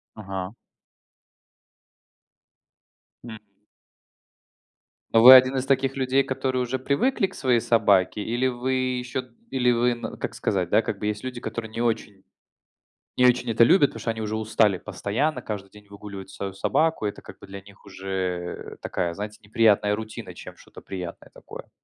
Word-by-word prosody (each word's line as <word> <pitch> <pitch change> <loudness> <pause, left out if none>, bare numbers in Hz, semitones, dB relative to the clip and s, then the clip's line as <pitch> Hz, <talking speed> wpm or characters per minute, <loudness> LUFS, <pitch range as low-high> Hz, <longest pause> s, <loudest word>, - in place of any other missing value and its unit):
Ага. 95 -2 -6 2.7
М. 110 -3 -9 1.7
Вы 115 +3 +10
один 130 +1 +7
из 130 - -1
таких 135 0 +1
людей, 130 0 +2
которые 130 -1 -2
уже 125 +1 -2
привыкли 195 - +1
к 190 - -7
своей 125 -7 +1
собаке, 105 -4 +2
или 120 +4 -1
вы 130 +1 -1
еще 130 0 -2 0.2
или 125 -2 +2
вы 120 +1 +2
на 120 - -7
как - - -5
сказать, - - -1
да, - - +3
как - - -4
бы 105 - -3
есть 105 0 -3
люди, 125 -2 -6
которые 115 -2 -5
не 115 - -4
очень, 105 -4 -2 1.0
не 125 - +6
очень 125 -1 +2
это 115 +1 +3
любят, 145 +3 +5
потому - - -10
что 115 - -2
они 110 -1 -4
уже 110 0 -3
устали 110 -3 +2
постоянно, 105 - -2
каждый 100 -3 -6
день 105 0 -17
выгуливать 100 -1 -9
свою 100 -1 -6
собаку, 160 +7 0
и 105 - +1
это - - -14
как - - -13
бы - - -13
для 100 0 -9
них 100 +1 -19
уже 95 -2 -5
такая, 85 -2 -2
знаете, 105 +3 -7
неприятная 105 -1 +3
рутина, 110 +1 -7
чем - - -11
что-то - - -15
приятное 90 -3 -8
такое. - - -12
115 Hz, 160 wpm, -24 LUFS, 100-130 Hz, 2.7 s, Вы